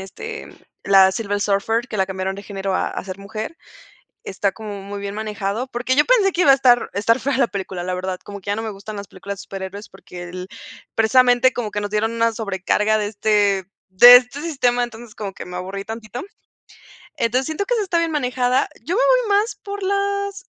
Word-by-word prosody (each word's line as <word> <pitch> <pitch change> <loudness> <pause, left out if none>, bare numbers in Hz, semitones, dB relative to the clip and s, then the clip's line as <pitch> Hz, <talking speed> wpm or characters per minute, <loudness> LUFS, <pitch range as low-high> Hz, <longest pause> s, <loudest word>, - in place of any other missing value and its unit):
este, 440 - -8 0.4
la 190 -1 +6
Silver 205 -1 -2
Surfer, 215 +5 0
que 215 - -5
la 190 -1 +1
cambiaron 190 0 -3
de 200 - -9
género 195 -2 -4
a - - 0
a - - -6
ser 190 0 -7
mujer. 215 +9 -6 0.7
Está 195 +1 -1
como 205 -1 -7
muy 200 +1 -7
bien 200 0 -5
manejado, 215 +2 -3
porque 250 +1 -1
yo 295 - +5
pensé 420 -7 +4
que 350 - +1
iba 285 - +7
a - - +8
estar 245 -2 +4
estar 220 +3 +2
fea 275 -1 -1
la 255 - +3
película, 190 -3 -5
la 185 +1 -2
verdad, 185 0 -3
como 200 -1 -9
que 190 - -22
ya 205 - +1
no 225 - -2
me 220 - -3
gustan 205 +1 -8
las 200 0 -7
películas 195 +1 -8
de - - -8
superhéroes 195 +2 -7
porque 175 -1 -11
el 180 +1 -7 0.5
precisamente 245 +2 +4
como 225 -4 -3
que 205 - -2
nos 205 0 -3
dieron 215 +2 0
una 230 0 +1
sobrecarga 210 0 0
de 210 -1 -1
este 205 -2 +1 0.2
de 240 +7 +10
este 255 +3 -4
sistema. 250 -7 +1
Entonces 235 -1 -8
como 200 -2 -5
que - - -9
me 180 - -8
aburrí 190 +2 -5
tantito. 225 +1 -7 1.0
Entonces 250 +3 0
siento 315 +6 -2
que - - 0
sí 455 - +1
está 360 -4 0
bien 335 -1 +1
manejada. 255 -2 +1
Yo 335 +9 -2
me - - +2
voy - - +3
más 440 +3 -2
por 405 0 -6
las 400 0 -1
220 Hz, 215 wpm, -21 LUFS, 195-260 Hz, 1.0 s, de